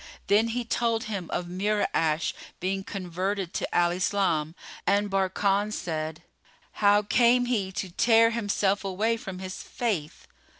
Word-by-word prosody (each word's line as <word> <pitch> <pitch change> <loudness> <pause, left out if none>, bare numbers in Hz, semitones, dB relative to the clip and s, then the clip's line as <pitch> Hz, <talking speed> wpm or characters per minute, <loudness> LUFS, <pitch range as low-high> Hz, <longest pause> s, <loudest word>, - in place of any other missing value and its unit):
Then 215 +3 +4
he 235 +1 -2
told 230 -1 0
him 200 -5 -5
of 175 - -2
Mura'ash 180 -4 0 0.3
being 195 +2 -2
converted 190 0 -3
to - - -3
Al 175 0 +4
Islam, 175 -4 0 0.3
and 205 0 +2
Barkan 195 +2 +1
said, 155 -4 -4 0.6
"How 205 0 +5
came 240 +3 +4
he 210 -6 -1
to 190 -2 -4
tear 230 +4 +4
himself 205 -3 0
away 205 +4 0
from 195 -5 -7
his 185 0 -6
faith[FN#34]?" 195 -11 -3
195 Hz, 135 wpm, -27 LUFS, 180-215 Hz, 0.6 s, How